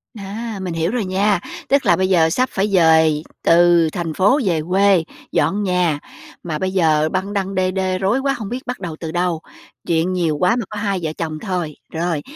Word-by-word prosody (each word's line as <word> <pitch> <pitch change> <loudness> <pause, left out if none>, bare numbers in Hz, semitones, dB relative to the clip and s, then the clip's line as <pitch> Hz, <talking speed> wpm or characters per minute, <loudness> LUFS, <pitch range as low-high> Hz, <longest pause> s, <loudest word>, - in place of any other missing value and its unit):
A, 210 +1 -6
mình 180 -2 -4
hiểu 165 +2 -1
rồi 235 -4 -1
nha, 195 +1 +1 0.3
tức 280 0 +3
là - - +5
bây 185 0 0
giờ 165 -4 +4
sắp 255 +10 0
phải 195 +2 0
dời 160 -5 +4 0.2
từ 170 -1 +5
thành 165 -2 -3
phố 205 - +3
về 165 -4 +1
quê, 195 -2 +4 0.3
dọn 205 +1 +1
nhà, 180 -5 +1 0.4
mà 155 -3 -3
bây 185 0 -1
giờ 155 -4 +2
băng 195 +2 -2
đăng 195 -1 -2
đê 185 0 +1
đê 185 -1 -1
rối 195 +7 +1
quá 275 0 0
hông 215 -7 -6
biết 250 +3 -5
bắt 250 - -4
đầu 170 -4 -5
từ 160 -2 -5
đâu. 175 -1 -1 0.5
Chuyện 170 +2 +1
nhiều 165 -5 0
quá 180 +8 +2
mà 235 -4 -2
có 210 - -7
hai 200 -3 -1
vợ 160 - -2
chồng 155 -2 -4
thôi. 180 -7 -3 0.2
Rồi, 165 -2 -1
185 Hz, 215 wpm, -19 LUFS, 165-200 Hz, 0.5 s, là